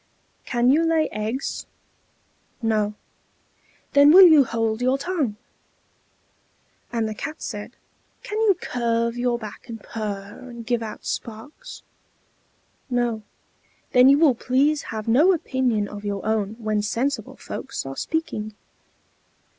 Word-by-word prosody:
"Can 240 0 +2
you 310 +4 +4
lay 325 -1 +2
eggs?" 220 +6 -3 0.9
"No." 215 -3 0 1.0
"Then 285 +1 +7
will 375 +3 +10
you 315 -5 +7
hold 225 -1 -1
your 255 +2 +2
tongue!" 285 - -2 1.6
And 230 -2 -1
the 215 - -4
Cat 305 +8 -6
said, 210 +1 -6 0.5
"Can 425 - -4
you 405 -5 +4
curve 235 -1 -1
your 245 0 0
back, 215 +1 -10
and 225 -1 -6
purr, 205 -2 -6
and 235 -1 -9
give 240 0 0
out 220 -1 -7
sparks?" 230 +5 -7 1.1
"No." 240 -3 0 0.7
"Then 250 +1 +7
you 280 - +6
will 300 -4 +5
please 275 +5 +1
have 220 -1 -5
no 295 +12 +5
opinion 255 - 0
of 205 0 -9
your 200 -1 -3
own 215 -1 0
when 215 -2 -1
sensible 240 +7 -2
folks 270 - -6
are 135 0 -6
speaking!" 215 - -3
235 Hz, 130 wpm, -23 LUFS, 215-275 Hz, 1.6 s, will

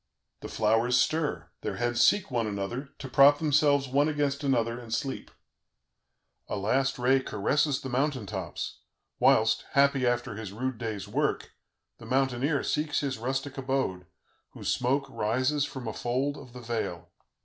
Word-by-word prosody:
The - - -7
flowers 115 +3 +2
stir, 125 - 0
their - - -3
heads 120 0 0
seek 205 -7 +3
one 115 -3 0
another, 105 +7 -4
to 135 - -7
prop 140 +2 +6
themselves 145 -2 +3
one 140 +4 +2
against 145 -1 -1
another 120 -3 +1
and 115 -2 -11
sleep. 130 +4 -3 1.2
A - - -3
last 130 +7 +1
ray 130 +2 +3
caresses 130 +5 0
the 130 - -5
mountain 130 -2 0
tops, 95 -4 -5 0.4
whilst, 110 0 +4
happy 140 -2 +4
after 120 0 0
his 105 -2 -7
rude 130 +1 -3
day's 110 -5 -4
work, - - -1 0.5
the 110 - -11
mountaineer 135 +3 +1
seeks 150 -1 0
his 135 -4 -3
rustic 135 +3 -3
abode, 130 -10 -2 0.5
whose - - -1
smoke 135 +3 0
rises 130 +5 0
from 130 -5 -7
a 110 - -3
fold 130 +6 -1
of 130 -4 -12
the 125 - -9
vale. 90 -8 -4
130 Hz, 155 wpm, -28 LUFS, 115-140 Hz, 1.2 s, prop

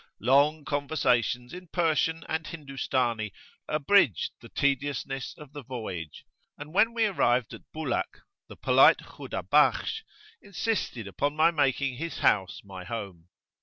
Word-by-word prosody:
[FN#7] - - -32
Long 140 +5 +3
conversations 125 -4 0
in 180 0 -9
Persian 160 -1 +1
and 160 0 -2
Hindustani 130 -7 -2 0.4
abridged 150 - +3
the - - -12
tediousness 140 -1 -1
of 150 -2 -13
the 145 - -7
voyage, 110 - -7 0.3
and 150 +2 -9
when 220 +4 +4
we 225 -1 +3
arrived 125 - +1
at - - -13
Bulak, 160 0 -3 0.3
the - - -11
polite - - +6
Khudabakhsh 445 - +1 0.4
insisted 195 - -2
upon 145 +9 -2
my 160 +2 +5
making 135 -4 0
his 165 +4 -5
house 95 -3 +1
my 95 -2 -9
home. 95 -5 -7
140 Hz, 130 wpm, -28 LUFS, 120-160 Hz, 0.4 s, polite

